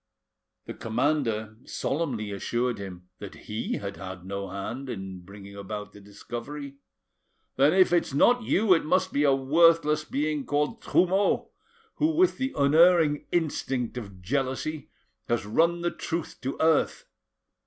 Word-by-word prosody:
The - - -6
commander 115 -3 -1
solemnly 130 -9 -2
assured 120 +4 -2
him 90 -2 -9
that 100 -2 -8
he 105 +1 -3
had 100 0 -5
had 95 -2 -8
no 100 0 -5
hand 115 +8 -5
in 95 -4 -6
bringing 100 +2 -12
about 105 +1 -6
the 105 - -13
discovery. 125 +8 -8 0.8
'Then 140 +4 +4
if 185 -1 +4
it's 175 - +2
not 245 - +4
you, 215 -2 +3
it 165 - +2
must 185 +4 +1
be 145 - +2
a 140 -2 +4
worthless 155 +2 +4
being 150 0 -2
called 150 +12 -1
Trumeau, 190 +3 +2 0.5
who, 315 +1 +1
with 365 +2 +3
the 265 0 -1
unerring 155 +1 +4
instinct 135 -8 -1
of 100 -7 -8
jealousy, 135 - -2 0.4
has 120 -3 0
run 170 +10 +2
the 175 0 0
truth 165 -1 -5
to 135 +1 -3
earth. 160 -1 +2
140 Hz, 145 wpm, -27 LUFS, 105-165 Hz, 0.8 s, Then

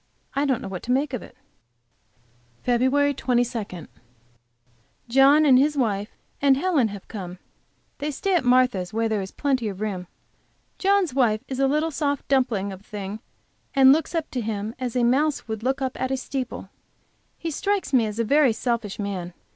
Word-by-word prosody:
I 280 +1 +1
don't 265 -4 0
know - - -5
what 190 -2 -6
to 245 - -2
make 275 +2 +1
of 250 - -2
it. - - -14 1.3
FEB 260 +4 +2
22. 235 - -1 1.2
John 275 +5 +5
and 260 -3 +6
his 295 +2 +2
wife 210 -5 0 0.3
and 275 -1 +5
Helen 300 -7 +2
have 200 -2 -9
come. 185 -4 -7 0.6
They 290 +2 -2
stay 375 +7 -1
at 345 - +3
Martha's, 245 -8 +3
where 225 +1 0
there 215 -2 -1
is 190 - -5
plenty 260 -3 -1
of 195 -2 -5
room. 195 -4 -3 0.7
John's 390 -5 +2
wife 230 -5 +2
is 260 -1 -5
a 270 - +4
little 305 +4 +1
soft 285 -2 -2
dumpling 220 -8 +1
thing, 205 0 -7 0.6
and 265 0 +8
looks 320 +3 -1
up 325 -2 -2
to 250 - -2
him 215 0 -3
as 250 -2 -3
a 250 - +2
mouse 275 +5 +1
would 220 -1 -5
up 265 0 -1
at 260 - 0
a 265 - 0
steeple. 260 -1 -5 0.7
He 330 - -4
strikes 395 0 -1
me 235 -4 +4
as 210 0 -6
a 230 - +1
very 275 +1 +4
selfish 230 -4 -2
man. 185 -4 -4
250 Hz, 175 wpm, -24 LUFS, 215-280 Hz, 1.3 s, and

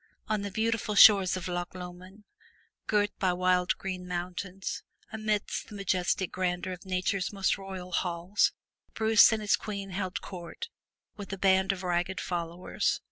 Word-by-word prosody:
On 215 -1 0
the 200 - -3
beautiful 220 +1 -1
shores 195 -3 +8
of 185 - -5
Loch 175 0 -4
Lomond, 185 +3 -10 0.6
girt 205 -1 +2
by 185 -2 +2
wild 180 0 +2
green 185 -1 -5
mountains, 180 +2 -4 0.3
amid 215 -1 0 0.2
the 210 - -10
majestic 190 -1 0
grandeur 185 0 -2
of 180 +1 -11
nature's 185 0 0
most 195 -2 +1
royal 190 -2 -8
halls, 175 +2 +1 0.4
Bruce 220 0 +6
and 220 -1 -1
his 205 - +4
queen 200 -2 -6
held 185 -1 -3
court 185 - -8 0.5
with 200 -2 -7
a 195 - -3
band 190 0 +3
of 190 -1 -5
ragged 180 0 -1
followers. 170 0 -2
190 Hz, 150 wpm, -29 LUFS, 180-200 Hz, 0.6 s, shores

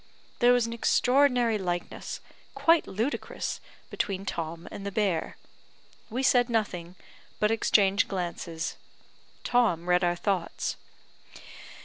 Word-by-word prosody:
There 245 0 +6
was 245 -2 +4
an 230 - -4
extraordinary 245 -1 +3
likeness, 175 -2 -4 0.3
quite 330 0 +4
ludicrous, 225 +9 -3 0.3
between 195 -1 -2
Tom 165 -2 -4
and 200 - -7
the 200 - -3
bear. 190 -6 -1 0.7
We 250 +4 -2
said 245 -2 +4
nothing, 185 -6 -2 0.4
but 210 +1 +2
exchanged 205 -3 +3
glances. 170 -3 -4 0.7
Tom 220 -9 +2
read 180 0 +3
our 175 0 +2
thoughts. 185 -1 -2
200 Hz, 110 wpm, -28 LUFS, 175-240 Hz, 0.7 s, There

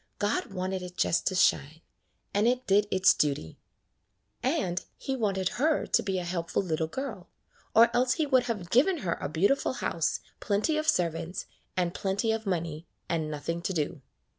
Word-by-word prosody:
God 205 0 0
wanted 185 0 -2
it 180 0 -9
just 165 - +1
to 185 - +1
shine, 160 -3 +2 0.5
and 205 +3 +3
it 250 +1 +1
did 205 +1 +3
its 185 0 +5
duty. 140 - -1 0.8
And 245 - 0
He 270 - -3
wanted 195 -6 0
her 310 0 +2
to - - +2
be 190 -2 -1
a 180 - -2
helpful 170 +1 -1
little 160 -3 -1
girl, 215 - -6 0.5
or 230 +1 +6
else 250 +1 +3
He 315 - 0
would 260 -3 +3
have 195 -7 -4
given 320 +10 +4
her 170 - +1
a - - -2
beautiful 195 - +2
house, - - -1 0.2
plenty 215 +9 +1
of 310 0 -1
servants, 170 - -1 0.3
and 175 -1 +1
plenty 205 +3 0
of 220 -1 -2
money, 165 -3 -2 0.2
and 160 -2 -1
nothing 160 +3 -3
to 190 - -2
do. 150 -2 -2
190 Hz, 175 wpm, -29 LUFS, 170-230 Hz, 0.8 s, or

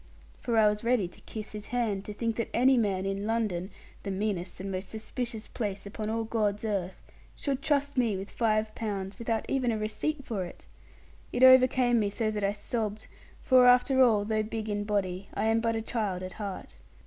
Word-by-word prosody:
For 235 -2 -1
I 215 -1 +6
was 210 +1 0
ready 230 -5 +2
to 175 - -17
kiss 215 -1 -6
his 210 -1 -7
hand, 220 -5 -1
to 210 - -6
think 230 0 -1
that 230 - -2
any 260 +3 +5
man 195 -5 +1
in 195 +1 -2
London 210 -5 -1 0.3
(the 200 - -5
meanest 195 -2 -2
and 195 +1 -4
most 185 0 -4
suspicious 220 +1 -5
place, 205 -4 -4
upon 215 +1 -5
all 225 +1 -1
God's 215 -2 -1
earth) 190 -4 -3 0.3
should 275 -2 -2
trust 285 -2 +1
me 225 -5 +1
with 195 +2 -7
five 215 -2 +1
pounds, 200 -3 -4
without 230 -1 -1
even 255 -3 +1
a 220 - -1
receipt 240 +7 -2
for 205 -5 -2
it! 175 - -10 0.7
It 245 - +1
overcame 255 -2 +6
me 205 -2 +1
so 215 +1 -1
that 210 -1 -3
I 200 +1 +2
sobbed; 215 0 -3 0.4
for, 255 -1 +6
after 250 +2 +5
all, 220 -5 +5
though 215 0 +1
big 220 0 -4
in 205 0 -1
body, 195 -2 -2
I - - 0
am 225 +1 +3
but 230 0 0
a 225 - -2
child 205 -6 -2
at 185 - -6
heart. 200 -3 -6
215 Hz, 205 wpm, -29 LUFS, 200-235 Hz, 0.7 s, I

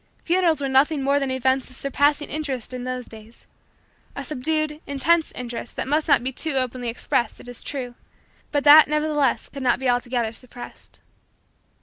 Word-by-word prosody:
Funerals 340 -3 +2
were 275 - -1
nothing 275 +2 +2
more 280 +1 +2
than 275 -1 -2
events 260 0 0
of 255 - -11
surpassing 285 +2 +1
interest 275 -6 -4
in 250 0 -5
those 255 -1 -4
days 220 +1 -13 0.7
a 280 - -5
subdued, 305 +2 -2
intense, 315 +4 +2
interest 240 -1 -7
that - - -3
must 300 +3 +1
not - - +4
be 260 - -1
too 310 +3 -1
openly 255 -2 -1
expressed, 230 0 -1
it - - -13
is 245 -1 -8
true, 255 -4 -5 0.6
but 290 -1 0
that 300 +1 +9
nevertheless 300 -2 0
could 275 - -9
not 250 -2 +2
be 265 +1 -3
altogether 245 -2 0
suppressed. 245 +1 -11
265 Hz, 170 wpm, -23 LUFS, 250-300 Hz, 0.7 s, that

